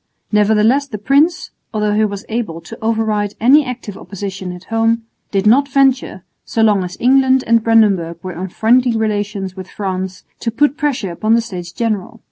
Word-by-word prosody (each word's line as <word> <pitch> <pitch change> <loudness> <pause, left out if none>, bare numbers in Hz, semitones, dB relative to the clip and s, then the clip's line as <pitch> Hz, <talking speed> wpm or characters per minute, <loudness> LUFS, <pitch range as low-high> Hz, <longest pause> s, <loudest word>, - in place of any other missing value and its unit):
Nevertheless 220 +6 +3
the 225 -6 -6
prince, 280 - +1 0.2
although 210 -1 +1
he 215 +1 +2
was 200 0 -5
able 220 -8 -3
to 225 - -10
override 220 -2 -1
any 275 +7 +5
active 245 -6 -6
opposition 195 -2 -6
at 180 0 -10
home, 225 +2 0 0.3
did 195 0 -1
not 265 +7 +5
venture, 265 -8 +1 0.2
so 225 - -1
long 205 -3 +3
as 180 0 -7
England 265 +1 +4
and 230 -1 +3
Brandenburg 200 -8 +3
were 185 -1 -5
on 180 +3 -5
friendly 235 +4 +2
relations 205 -3 -2
with 185 -1 -9
France, 190 -2 -4 0.2
to 230 - -2
put 285 +5 +1
pressure 280 - -2
upon 215 +6 +1
the 235 - +2
States 180 -6 -7
General. 225 +1 -3
220 Hz, 175 wpm, -17 LUFS, 195-235 Hz, 0.3 s, any